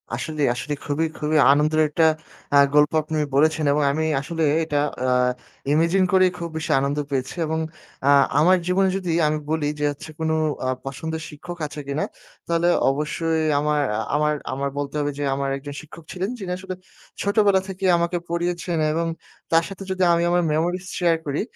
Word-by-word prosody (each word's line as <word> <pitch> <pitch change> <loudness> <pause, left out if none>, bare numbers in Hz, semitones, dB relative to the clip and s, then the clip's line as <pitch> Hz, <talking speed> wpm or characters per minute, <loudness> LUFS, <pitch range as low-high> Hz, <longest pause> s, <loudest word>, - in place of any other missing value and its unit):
আসলে, 155 +4 -4
আসলে। 125 +5 -4
খুবই, 145 +3 0
খুবই 155 +1 0
আনন্দের 155 +2 +3
একটা 160 +2 +2 0.5
আ - - +8 0.2
গল্প 150 0 +5
আপনি 155 +1 -3 0.2
বলেছেন 155 +2 +3
এবং 150 +1 +2
আমি 155 +3 -1 0.2
আসলে 165 +2 -3 0.2
এটা 150 -2 -2 0.3
আ - - +1 0.7
ইমাজিন 170 +5 +3
করেই 185 -1 +4
খুব 170 -1 -5
বেশি 160 - -3
আনন্দ 140 +2 -1
পেয়েছি 130 -1 -2
এবং 160 +1 -1 0.5
আ - - +6 0.3
আমার 180 +5 +5
জীবনে 190 +1 +3
যদি 180 -3 -3 0.2
আমি 155 0 0
বলি 155 -2 0
যে 150 - +1
হচ্ছে 145 +2 -10
কোন 160 0 -1 0.4
আ - - 0 0.2
পছন্দের 160 +4 -4
শিক্ষক 175 +4 -9
আছে 145 +1 -9
কিনা? 140 +2 -1 0.4
তাহলে 170 0 +1 0.2
অবশ্যই 160 +3 -1 0.2
আমার 150 0 +1
এ - - -1 0.2
আমার 150 0 +2 0.2
আমার 140 +1 -2
বলতে 145 0 -3
হবে 145 0 0
যে, - - -1
আমার 140 0 -2
একজন 145 +1 -8
শিক্ষক 160 +1 -13
ছিলেন 190 +2 -3
যিনি 190 -3 -5
আসলে 185 0 -6 0.5
ছোটবেলা 200 -1 +3
থেকেই 190 0 -1
আমাকে 170 +1 0
পড়িয়েছেন 170 0 -2
এবং 165 +2 0 0.4
তার 165 0 +5
সাথে 195 0 -8
যদি 185 0 0
আমি 170 0 +2
আমার 175 0 +3
মেমোরিস 175 +4 -1
শেয়ার 170 -2 +3
করি 145 0 -1
160 Hz, 180 wpm, -23 LUFS, 150-175 Hz, 0.7 s, আ